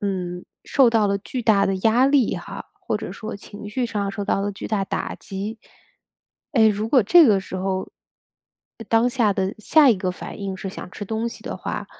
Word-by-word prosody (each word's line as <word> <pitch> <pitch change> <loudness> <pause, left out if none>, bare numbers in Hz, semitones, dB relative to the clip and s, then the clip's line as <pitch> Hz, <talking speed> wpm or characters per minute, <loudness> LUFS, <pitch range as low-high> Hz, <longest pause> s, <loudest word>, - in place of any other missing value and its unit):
嗯， 180 -3 -3 0.2
受 265 -4 +4
到 220 -3 +3
了 200 0 0
巨 250 +5 -5
大 210 -3 +4
的 195 - 0
压 230 +3 +4
力 275 -4 +3
哈， - - -8
或 - - -2
者 - - -6
说 220 0 -7
情 205 +1 -10
绪 245 +3 -1
上 205 -3 -2
受 200 +1 -4
到 195 - 0
了 200 +1 -1
巨 195 - -7
大 210 -3 0
打 - - -3
击。 200 +4 -6 0.9
哎， 225 -6 +5
如 210 +1 -1
果 255 +1 +5
这 320 - +7
个 205 -4 +4
时 190 -1 -7
候， 190 0 -2 0.9
呃， 225 - -8
当 230 +2 +3
下 235 -5 +2
的 190 +1 -2
下 285 +6 +5
一 225 - +3
个 185 0 -2
反 180 - -9
应 195 -1 -4
是 195 - -6
想 185 - -8
吃 205 - -6
东 220 +3 -2
西 - - -11
的 - - -5
话， - - -5
210 Hz, 230 characters per minute, -23 LUFS, 195-230 Hz, 0.9 s, 这